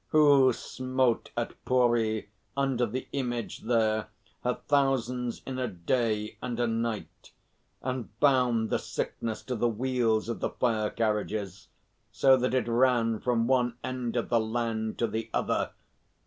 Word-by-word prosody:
Who 145 -4 +6
smote 130 0 -1
at - - -4
Pooree, 120 -4 +2 0.3
under 135 -3 +1
the 130 +5 -4
Image 120 -4 -3
there, 110 -2 +1 0.4
her 125 0 +1
thousands 125 -4 +1
in 130 -1 -4
a 125 - 0
day 105 +3 -1
and 120 -1 -4
a 120 - +3
night, 115 -1 -3 0.5
and 130 -3 -3
bound 125 -5 +3
the - - +2
sickness 110 -2 -4
to 125 - -3
the 120 +1 +1
wheels 115 -1 +1
of 115 - -3
the - - -1
fire 110 -4 0
carriages, 105 -3 -2 0.4
so 130 +5 +5
that 125 0 0
it 125 -3 +1
ran 115 -2 +3
from 120 -2 +1
one 125 -1 +2
end 125 -2 -3
of 120 - -1
the 120 - +3
land 110 -1 -2
to 120 - +1
the 115 0 -3
other? - - 0
120 Hz, 150 wpm, -29 LUFS, 110-130 Hz, 0.5 s, Who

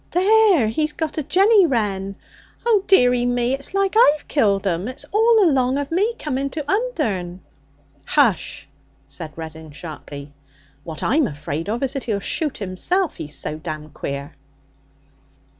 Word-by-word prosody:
There! 390 - +4
He's 305 +7 -1
got 315 -1 -3
a - - 0
jenny 385 +6 +4
wren. 200 -7 -1 0.5
Oh, 435 -5 +3
dearie 250 -9 +4
me! 245 +1 +1
it's 275 +7 -4
like 395 -1 +1
I've 305 -10 +4
killed 205 -8 +1
'em; 180 +1 -1
it's 255 - -6
all 445 -1 +4
along 260 -3 +2
of 285 +1 -3
me 415 +7 +1
coming 275 -2 -2
to 305 0 -5
Undern.' 225 - -1 0.6
'Hush!' 230 - +1 0.4
said 140 +3 -8
Reddin 160 -1 -8
sharply. 145 -1 -9 0.5
'What 160 -1 -7
I'm 290 -1 +2
afraid 150 +2 -5
of 235 +5 -2
is 270 - -1
that 275 - -4
he'll 215 -4 -1
shoot 300 +8 -2
himself, 280 - -1
he's 150 -1 -6
so 155 +1 -4
damned 155 -2 -7
queer.' 140 -1 -5
250 Hz, 150 wpm, -21 LUFS, -, 0.6 s, There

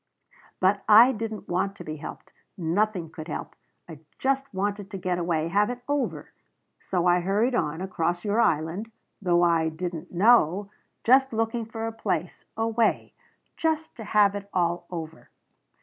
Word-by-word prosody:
"But 195 +2 +2
I 230 +5 +9
didn't 220 -2 -5
want 195 +3 -1
to 175 - -9
be 155 -1 -6
helped. - - -9 0.3
Nothing 180 0 0
could 160 -1 -8
help. 155 - -6 0.3
I 160 -4 -10 0.2
just 270 0 0
wanted 200 +1 -2
to 200 - -6
get 180 -1 -1
away 165 -2 0
have 205 +5 +2
it 245 0 -6
over. 285 -1 -2 0.5
So 180 -2 -1
I 175 0 +4
hurried 205 +8 +1
on 160 -6 -1
across 175 -1 -2
your 210 +3 +2
Island 165 +6 0 0.3
though 175 -2 +3
I 165 -2 +3
didn't 170 +1 -6
know 200 -1 +4 0.3
just 265 +1 +4
looking 225 +1 -1
for 225 0 -5
a 225 - -2
place 180 -6 -3
a 225 0 +1
way. 225 0 0 0.4
Just 320 -1 -1
to 225 - -7
have 205 -1 +3
it 200 0 -6
all 175 -1 0
over." 160 -2 -7
195 Hz, 165 wpm, -26 LUFS, 175-225 Hz, 0.5 s, I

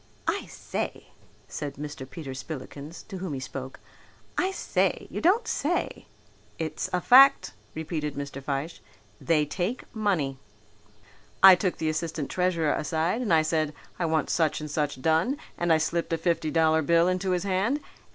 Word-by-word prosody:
"I - - -1
say!" - - -5 0.4
said 145 +4 -5
Mr. 145 -2 -7
Peter 135 -1 -7
Spillikins, 145 +3 -8
to 195 -4 -7
whom 180 -4 -4
he - - -4
spoke, 130 0 -7 0.6
"I 370 - +1
say! 385 - 0
You - - -4
don't 425 +7 +3
say!" 345 -1 -1 0.5
"It's 155 -1 -3
a 180 - +1
fact," 270 +8 +6 0.2
repeated 155 -2 -3
Mr. 140 -1 -5
Fyshe. 140 +4 -3 0.4
"They 155 -3 +2
take 180 - -3
money. 170 -11 0 1.0
I 190 0 +12
took 180 0 0
the 160 - -2
assistant 155 -2 -3
treasurer 175 -4 +1
aside 165 +8 0
and 230 - -1
I 160 -1 +5
said, 155 -1 0 0.2
'I 175 - +1
want 160 -2 0
such 160 -3 +1
and 150 -1 -6
such 145 -3 -2
done,' 165 - +2 0.2
and 175 -1 0
I 160 - +6
slipped 165 +2 -1
a - - +2
fifty 165 -1 0
dollar 160 0 +3
bill 170 +3 +4
into 185 +1 0
his 180 -1 +1
hand. 200 +9 +1
160 Hz, 160 wpm, -27 LUFS, 150-185 Hz, 1.0 s, I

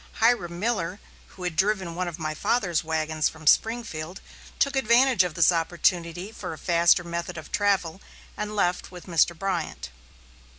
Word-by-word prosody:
Hiram 185 -7 +1
Miller, 200 -4 -1 0.3
who 185 - -12
had 175 -2 -2
driven 190 -2 0
one 180 +1 -2
of 170 -2 -5
my 155 -2 -3
father's 175 0 0
wagons 160 -1 0
from 160 0 -14
Springfield, 190 -4 +1 0.4
took 280 0 +1
advantage 250 -3 +4
of 175 -4 -4
this 170 +1 +5
opportunity 175 +2 0
for 225 - -6
a - - -9
faster 170 +1 +3
method 170 0 -5
of 160 - -9
travel 195 -3 0 0.3
and 210 0 -4
left 180 -3 0
with 180 -1 -11
Mr. 170 -1 +2
Bryant. 80 - -3
175 Hz, 160 wpm, -26 LUFS, 165-205 Hz, 0.4 s, this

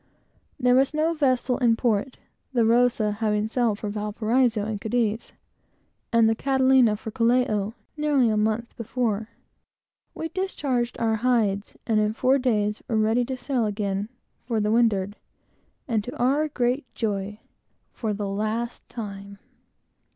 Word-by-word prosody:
There 250 -1 +4
was 270 +3 +3
no 315 +2 +2
vessel 255 -4 +1
in 235 -3 +4
port, 235 +2 0 0.4
the 235 -3 +3
Rosa 230 -2 +3
having 210 0 0
sailed 230 -2 0
for 210 - -5
Valparaiso 215 +2 0
and 210 -2 -4
Cadiz, 225 -1 -1 0.8
and 230 -1 +5
the 225 - +3
Catalina 260 -2 +3
for 220 +1 -7
Callao, 230 -3 +1 0.2
nearly 295 -5 +2
a 215 - +1
month 220 +2 -1
before. 225 -2 -2 0.9
We 325 - -4
discharged 280 -11 -2
our 225 -1 +1
hides, 215 -4 0
and 220 -2 +2
in 210 0 +1
four 260 +4 +2
days 210 -5 0
were 225 -4 0
ready 220 +3 +2
to 260 +1 -4
sail 245 -3 -1
again 200 0 -2 0.4
for 230 -3 0
the 210 0 +1
windward; 210 -4 +2 0.7
and, 225 -5 0
to 250 +7 -7
our 280 +5 +2
great 255 -1 -1
joy 210 -1 -3 0.5
for 220 -3 -3
the 205 0 -3
last 215 +4 -3
time! 200 -3 -7
230 Hz, 145 wpm, -25 LUFS, 210-250 Hz, 0.9 s, and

